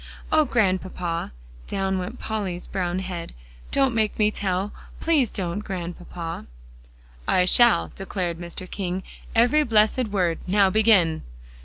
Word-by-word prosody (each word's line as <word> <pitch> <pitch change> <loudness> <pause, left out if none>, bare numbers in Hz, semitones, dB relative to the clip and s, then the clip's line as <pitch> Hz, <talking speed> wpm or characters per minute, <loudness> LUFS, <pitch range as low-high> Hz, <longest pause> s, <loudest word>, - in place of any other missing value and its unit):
"Oh, 310 -1 +5
Grandpapa!" 185 - 0 0.4
down 190 -1 0
went 180 - -6
Polly's 195 -5 -3
brown 180 -2 -2
head, 180 -3 -5 0.3
"don't 270 -3 +2
make 220 -2 0
me 210 -1 +3
tell. 195 0 -1 0.3
Please 300 -8 +2
don't, 185 0 -2
Grandpapa." 175 -3 -6 0.8
"I 180 - +4
shall!" 230 -1 +5
declared 180 -3 -3
Mr. 175 +1 -6
King; 185 -1 -3 0.3
"every 245 +7 +5
blessed 225 -1 +3
word. 180 -5 0
Now 195 0 +4
begin!" 205 -7 +4
190 Hz, 125 wpm, -24 LUFS, 180-220 Hz, 0.8 s, Oh